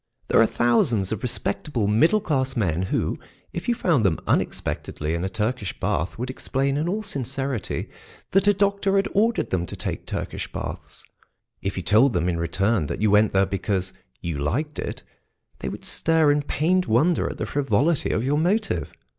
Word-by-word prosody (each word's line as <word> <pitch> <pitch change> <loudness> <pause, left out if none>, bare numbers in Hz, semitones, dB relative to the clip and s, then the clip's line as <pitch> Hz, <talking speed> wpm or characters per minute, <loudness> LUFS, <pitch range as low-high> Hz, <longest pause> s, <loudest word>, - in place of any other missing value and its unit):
There - - +5
are 115 - +5
thousands 115 -5 +2
of 110 - -2
respectable 120 0 -1
middle 155 - +4
class 135 -7 0
men 90 -7 0
who, - - -1 0.3
if 175 - -4
you 240 - +3
found 165 - +2
them 90 -5 +2
unexpectedly 75 +1 -1
in 85 +1 -2
a 95 - -1
Turkish 105 +1 -2
bath, 80 +5 -1
would 125 +2 -3
explain 135 +1 -1
in 155 +4 0
all 210 +4 -2
sincerity 135 - -3 0.4
that 195 +1 +3
a 205 - +6
doctor 200 0 +1
had 195 - +3
ordered 225 +3 +2
them 90 -1 0
to - - -5
take - - -4
Turkish - - -4
baths; - - -7 0.6
if 100 0 -3
you 90 - -2
told 115 +9 +4
them 90 -1 +1
in 85 -2 0
return 95 +2 +1
that - - -4
you 105 0 +2
went 105 0 +5
there 95 0 +3
because 95 -1 -2 0.3
you 85 -4 -3
liked 140 - -2
it, - - -5 0.6
they 65 - -3
would - - -8
stare 160 -2 +3
in 145 0 +2
pained 175 +6 +1
wonder 150 +10 +2
at - - -7
the - - -2
frivolity 140 +3 +1
of 110 - 0
your 145 +3 +1
motive. 200 +6 0
125 Hz, 185 wpm, -24 LUFS, 100-160 Hz, 0.6 s, a